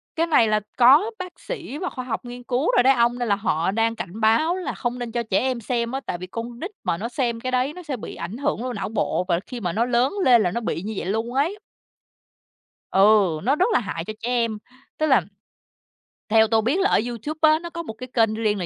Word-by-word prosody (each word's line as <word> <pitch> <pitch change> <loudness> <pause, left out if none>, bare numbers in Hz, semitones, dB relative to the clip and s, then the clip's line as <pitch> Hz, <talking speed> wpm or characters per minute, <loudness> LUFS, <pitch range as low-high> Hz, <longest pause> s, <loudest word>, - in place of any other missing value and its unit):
cái 330 +1 +1
này 235 -8 +4
là 215 0 +2 0.2
có 285 - +6
bác 365 -1 -8
sĩ 300 - -6
và 365 +2 -3
khoa 255 -1 -7
học 245 - -4
nghiên 245 0 -8
cứu 255 +5 0
rồi 245 - +6
đấy 270 +1 +6
ông, 240 0 +2
nên 240 - -1
là 200 - +3
họ 180 -3 0
đang 225 +2 +1
cảnh 205 +3 -7
báo 230 +11 +3
là 370 - -4
không 245 0 -3
nên 240 -2 -5
cho 235 0 -1
trẻ 200 -3 +1
em 255 -2 -1
xem 235 +1 -2
á. 270 - -2
Tại 175 - -3
vì 185 +1 -8
con 235 +4 -6
nít 375 +5 -5
mà 165 - 0
nó 230 +5 -4
xem 235 -3 -1
cái 255 +2 -4
đấy 255 +4 0
nó 360 0 -10
sẽ 280 -5 -4
bị - - -8
ảnh 215 +7 -6
hưởng 270 -4 -1
vô 255 -1 -3
não 200 -2 -4
bộ, 210 -4 0
và 170 -1 +1
khi 245 -3 -7
mà 175 -3 -2
nó 230 +2 +1
lớn 250 +6 +1
lên 240 -3 +6
là 175 - 0
nó 235 - -2
bị 175 - -2
như 215 +3 -5
vậy - - -3
luôn 225 +5 -2
ấy. 330 +10 0 1.3
Ừ, 195 -5 +4
nó 275 +4 +2
rất 365 - +3
là - - +4
hại 175 -6 -5
cho 215 - -5
trẻ 240 - -4
em, 230 -3 0 0.4
tức 310 - +1
là 265 -9 +4 1.1
theo 220 0 +6
tôi 220 0 +2
biết 270 - +1
là 390 +1 +3
ở - - +4
YouTube 245 +7 -5
á, 310 0 +5
nó 340 0 -7
có 335 0 -6
một 220 - -7
cái 255 +3 -9
kênh 225 -3 +2
riêng 215 -2 0
là 175 - -2
240 Hz, 265 wpm, -23 LUFS, 220-265 Hz, 1.3 s, có